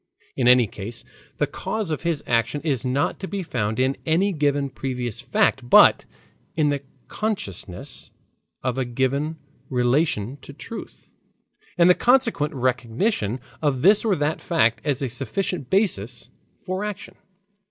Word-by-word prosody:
In 125 - +1
any 125 -1 +7
case, 105 +3 -8 0.3
the - - +2
cause 215 -6 -3
of 155 - -2
his 165 -3 -1
action 120 +5 +1
is 140 -7 -1
not 130 +2 0
to 190 - -5
be 200 -1 -3
found 110 -7 -2
in 130 +1 +2
any 185 +5 +2
given 145 -3 0
previous 125 -4 -4
fact, - - +1
but - - +7 0.5
in 155 -2 +2
the 145 -1 -1 0.3
consciousness 125 - -5 0.5
of 125 0 -1
a - - +1
given 135 +6 -1 0.3
relation 125 -1 +1
to 140 - -12
truth, 225 +9 -10 0.6
and 170 0 +6
the 180 - +8
consequent 230 - +2
recognition 125 - 0 0.2
of 140 -5 0
this 205 +3 +6
or 215 -4 +2
that 150 0 -1
fact 135 -10 +2
as 145 -3 -1
a - - 0
sufficient 135 - -3
basis 125 - 0 0.3
for 185 +1 -2
action. 210 -2 -6
140 Hz, 145 wpm, -23 LUFS, 125-170 Hz, 0.6 s, the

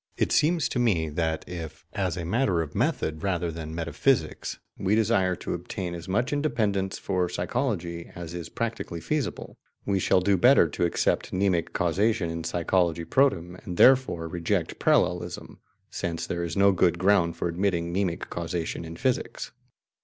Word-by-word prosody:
It - - +1
seems 160 +1 +3
to 125 - -2
me 90 -10 +2
that 80 +1 -2
if, 85 -4 -7
as 95 -4 -1
a 85 - -4
matter 95 -3 +1
of 75 - -9
method 80 0 -1
rather 90 -3 -1
than 80 -1 -6
metaphysics, 85 +4 0 0.2
we 95 +2 +1
desire 100 -5 +2
to - - -5
obtain 90 -2 -4
as 85 +1 -7
much 120 +9 0
independence 110 -10 0
for 90 -2 -1
psychology 90 -3 -2
as 85 -1 -7
is 85 -2 -6
practically 115 -7 -4
feasible, 145 - -3 0.3
we 100 -1 +1
shall 95 - +3
do 95 +1 +2
better 125 -2 +6
to 80 - -1
accept 85 - 0
mnemic 95 -3 +1
causation 95 0 +1
in 85 0 -4
psychology 85 -1 0
protem, 90 -10 +1
and 90 -2 -6
therefore 130 -11 +5
reject 85 +1 -2
parallelism, - - 0 0.3
since 85 -1 -3
there 85 0 -3
is 85 +1 -4
no 100 0 +6
good 90 -2 +2
ground 90 -3 +3
for - - -1
admitting 85 -1 -1
mnemic 90 -3 -1
causation 85 -1 -3
in 80 0 -8
physics. 130 +6 -2
90 Hz, 160 wpm, -26 LUFS, 85-100 Hz, 0.3 s, better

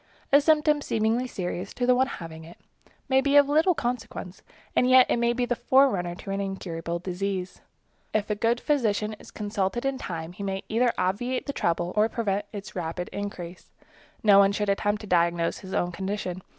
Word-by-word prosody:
A 285 - +8
symptom 300 -1 +3
seemingly 225 +1 0
serious 180 -3 -5
to 245 - 0
the 250 - +5
one 260 +1 +2
having 165 -8 -8
it 165 +2 -13 0.5
may 265 0 +4
be 280 +1 +1
of 285 -1 +7
little 320 +5 +3
consequence, 235 -7 -4 0.3
and 250 - +3
yet 255 0 +8
it - - +2
may 235 0 +2
be 245 +1 0
the 245 - -1
forerunner 235 -11 +3
of 175 - -13
an 195 0 -2
incurable 170 -4 -4
disease. 185 +1 -4 0.5
If 215 -1 0
a - - +3
good 230 +3 +1
physician 220 -8 0
is - - -13
consulted 205 +2 -2
in 270 -1 -1
time, 165 -5 -5
he 190 - -10
may 195 0 -3
either 235 +2 +2
obviate 245 +7 -1
the 280 - -3
trouble 175 -3 -1
or 215 +1 +3
prevent 205 -3 -1
its 205 -1 -8
rapid 175 0 -4
increase. 185 -3 -6 0.5
No 205 -2 +7
one 200 0 +5
should 210 0 -1
attempt 205 +1 0
to 210 - -9
diagnose 170 -2 +1
his 190 -1 -7
own 175 - 0
condition. 190 0 -4
205 Hz, 190 wpm, -26 LUFS, 180-245 Hz, 0.5 s, A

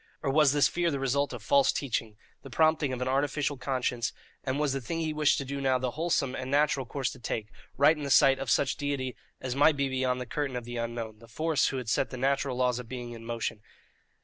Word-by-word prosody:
Or 140 - +1
was 150 -1 +5
this 145 0 +4
fear 175 -1 0
the 140 - -1
result 135 +1 0
of 120 -4 -7
false 140 +4 +4
teaching, 115 -5 -3 0.2
the 135 - -11
prompting 155 -1 +2
of 125 0 -2
an - - -3
artificial 140 +2 0
conscience, 125 -3 -1 0.3
and 130 +1 -1
was 150 -3 +1
the 135 - -2
thing 165 +8 -3
he 155 -1 -1
wished 150 -1 +3
to 140 - -3
do 140 +1 -4
the 130 -2 +1
wholesome 155 -3 0
and 130 0 -5
natural 145 -2 +2
course 135 -1 -2
to 130 - -11
take 110 -2 -4 0.3
right 145 +4 +6
in 150 - -8
the 140 - -3
sight 135 0 +5
of 135 - -4
such 130 +4 +2
Deity 140 -3 -2 0.2
as 130 -1 -4
might 145 +1 +4
be 140 0 +1
beyond 130 -1 0
the 125 - -4
curtain 135 +1 -3
of 125 - -3
the 120 0 -6
unknown, 115 -2 -4
the 115 - -15
Force 155 +5 +1
who 135 - -2
had 125 -3 -5
set 110 - +1
the 130 - -7
natural 135 0 0
laws 125 -1 +1
of 120 -2 -9
being 125 -2 -6
in 115 -1 -9
motion? 115 -2 -3
135 Hz, 245 wpm, -29 LUFS, 125-145 Hz, 0.3 s, right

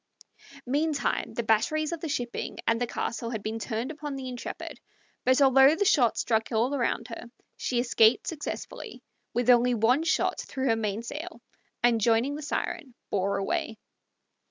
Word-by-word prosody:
Meantime 290 -1 0
the 235 - -1
batteries 300 +9 +1
of 335 - -3
the 325 - -4
shipping 245 -4 -3
and 230 +1 +1
the 245 - +1
castle 230 0 -3
had 220 -4 -4
been 220 +1 -3
turned 230 +4 -3
upon 295 -2 -6
the 265 -1 -6
Intrepid, 245 -1 -7 0.5
but 255 +2 +4
although 270 +2 +6
the 405 - 0
shot 250 - +4
struck 225 0 0
all 235 +4 +1
around 240 -3 -1
her, 230 - -7 0.3
she 245 - -1
escaped 230 -1 +4
successfully 310 -2 -6 0.3
with 245 +1 +4
only 245 0 +4
one 235 +6 +3
shot 325 0 +1
through 265 0 -4
her 230 -4 +3
mainsail, 230 - -4 0.4
and, 235 -2 +4
joining 230 +5 +2
the 300 - -5
Siren, 285 -2 -4 0.2
bore 200 0 0
away. 215 +3 -2
245 Hz, 160 wpm, -27 LUFS, 225-285 Hz, 0.5 s, although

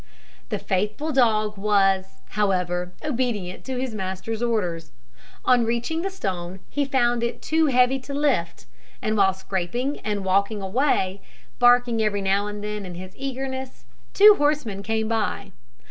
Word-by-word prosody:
The - - -1
faithful 210 +11 -1
dog 215 -5 +2
was, 195 -7 +1
however, 180 -3 0
obedient 235 -10 -2
to 260 -1 -3
his 255 -3 -3
master's 190 +2 -4
orders. 180 -9 -1 0.5
On 250 -2 +5
reaching 235 +8 -1
the 390 - -2
stone 190 - -4
he 290 -1 0
found 240 -3 +1
it 235 0 -2
too 320 0 +1
heavy 255 0 +3
to 270 +2 -8
lift, 270 - 0 0.3
and 215 - -1
while 190 -2 +3
scraping 195 +9 -3
and 205 -2 -3
working 200 +3 +1
away, 195 -2 0 0.4
barking 245 -2 +4
every 205 -2 0
now 195 +2 +1
and 210 0 -6
then 210 -1 -4
in 180 -2 -7
his 185 +1 -9
eagerness, 265 -1 -5 0.3
two 420 +1 +9
horsemen 290 -9 0
came 220 +1 -1
by. 210 -3 -2
215 Hz, 145 wpm, -24 LUFS, 195-255 Hz, 0.5 s, two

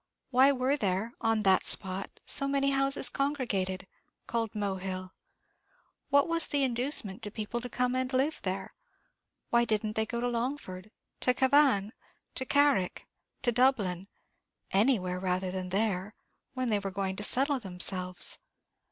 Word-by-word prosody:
why 265 +2 +6
were 265 +1 +1
there, 210 -2 -1
on 225 -2 +1
that 190 -2 +4
spot, 190 +1 +2 0.2
so 275 - +5
many 275 0 +1
houses 275 0 +2
congregated, 215 -10 -2 0.4
called 230 -2 -3
Mohill? 190 -2 -4 1.0
what 285 0 +4
was 335 -1 +2
the 285 -1 +1
inducement 245 -5 +1
to 210 - -4
people 220 +3 -4
to 250 - -6
come 250 +1 0
and 255 0 -1
live 275 +4 0
there? 190 0 -4 0.8
Why 235 0 +4
didn't 215 -1 -1
they 220 0 0
go 235 - -3
to 245 - -1
Longford, 235 -6 -4 0.3
to 250 - +1
Cavan, 260 -6 +3 0.4
to 260 - -3
Carrick, 280 -10 +2 0.4
to 245 - +3
Dublin, 210 -7 +1 0.6
anywhere 195 -4 +1
rather 185 0 -1
than 185 -1 -4
there, 195 0 -1 0.4
when 255 -1 -1
they 210 -2 +2
were 200 -1 -4
going 190 0 -3
to 210 - -4
settle 270 +5 +2
themselves?" 180 -2 -2
225 Hz, 145 wpm, -29 LUFS, 190-260 Hz, 1.0 s, why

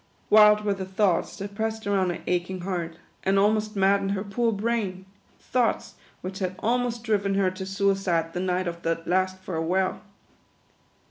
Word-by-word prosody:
"Wild 210 0 +7
were 205 - +2
the 195 -1 -5
thoughts 190 -2 0
that 200 +1 -6
pressed 220 +1 -3
around 195 -2 +1
her 175 - -4
ach 175 0 0
ing 185 -1 -5
heart, 175 -3 -3 0.2
and 195 +1 +2
almost 215 +1 +2
maddened 195 0 +2
her 195 -1 -2
poor 230 +3 0
brain; 205 -3 -2 0.3
thoughts 245 -2 0 0.3
which 190 +1 -6
had 185 -1 -2
almost 240 0 -1
driven 200 -3 +1
her 195 -2 +2
to 190 0 -7
suicide 195 -4 0
the 180 - -3
night 185 0 0
of 170 0 -5
that 165 0 -2
last 185 +1 +1
farewell. 185 +2 -1
195 Hz, 165 wpm, -26 LUFS, 185-210 Hz, 0.3 s, Wild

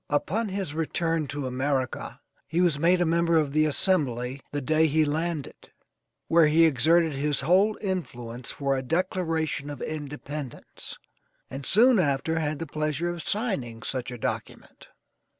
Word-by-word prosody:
Upon 200 +9 0
his 190 -5 -3
return 165 0 -1
to 140 +1 -4
America 130 0 -2 0.3
he 160 +5 -1
was 170 -5 +3
made 175 +3 +3
a - - +3
member 170 0 +2
of 150 -3 +1
the 155 0 +4
Assembly 135 -6 0
the 145 - -2
day 155 +3 +2
he 155 +1 +2
landed, 155 0 -3 0.6
where 165 -1 +5
he 160 +2 +5
exerted 160 +3 +3
his 140 0 0
whole 190 +9 +3
influence 125 - -4
for 140 -1 -1
a 130 - -1
Declaration 160 -1 -1
of 145 - -6
Independence, 145 -2 -7 0.5
and 135 +1 -5
soon 235 +2 +5
after 160 +1 +1
had 155 -1 -1
the 165 - -4
pleasure 155 +2 -2
of 175 -1 -6
signing 140 - -2
such 130 -3 -3
a 125 - -6
document. - - -6
155 Hz, 150 wpm, -26 LUFS, 140-170 Hz, 0.6 s, where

